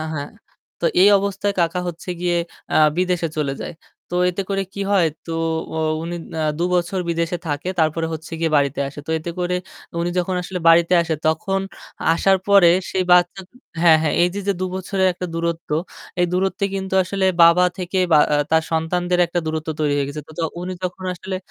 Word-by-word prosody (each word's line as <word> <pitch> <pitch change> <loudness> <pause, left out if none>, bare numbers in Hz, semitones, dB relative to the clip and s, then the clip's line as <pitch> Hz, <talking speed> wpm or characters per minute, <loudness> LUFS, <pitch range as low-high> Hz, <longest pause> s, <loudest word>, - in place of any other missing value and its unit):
হ্যাঁ 145 -1 -5 0.5
তো - - -4 0.2
এই 200 - +8
অবস্থায় 200 +1 -1
কাকা 170 +2 +1
হচ্ছে 175 +2 -8
গিয়ে 175 -1 +1 0.4
আ - - +4 0.2
বিদেশে 180 -2 0
চলে 140 -2 -1
যায়। - - -6 0.4
তো - - 0
এতে 195 +2 -3
করে 195 0 0
কি 200 - -5
হয় 185 -5 +4 0.2
তো 165 - -4 0.4
ও - - -3 0.3
উনি 175 +1 -4 0.2
না - - -3 0.2
দুবছর 180 +1 0
বিদেশে 170 +1 -1
থাকে 145 +5 -3
তারপরে 160 +1 +1
হচ্ছে 160 +1 -7
গিয়ে 165 - +1
বাড়িতে 140 -1 +1
আসে। 145 - -9
তো - - -5
এতে 170 +2 -5
করে 180 0 0 0.4
উনি 175 +1 -1
যখন 180 +1 0
আসলে 180 +1 -5
বাড়িতে 170 +2 +5
আসে 165 -1 -1
তখন 195 +5 0 0.5
আসার 190 +3 +3
পরে 200 -4 +7 0.2
সেই 185 -1 0
বাচ্চা 180 +2 +4
তো - - -43 0.3
হ্যাঁ, 160 -2 +7
হ্যাঁ 155 - 0
এইযে 180 +3 0
যে - - +4
দু - - 0
বছরের 190 0 0
একটা 180 +1 -5
দূরত্ব 170 -1 -3 0.5
এই 175 - +4
দূরত্বে 190 +2 0
কিন্তু 190 0 -3
আসলে 190 +1 -2 0.2
বাবা 170 +2 +7
থেকে 185 +1 -2
বা 150 - +7 0.2
আ - - +4
তার 160 0 +4
সন্তানদের 175 +2 0
একটা 175 +1 -2
দূরত্ব 155 0 -3
তৈরি 150 -1 +1
হয়ে 140 -1 0
গেছে। 150 +1 -5
তো 160 - -12
য - - -1 0.2
উনি 185 +1 -4
যখন 185 +1 -5
আসলে, 190 +1 -5
175 Hz, 195 wpm, -21 LUFS, 160-185 Hz, 0.5 s, এই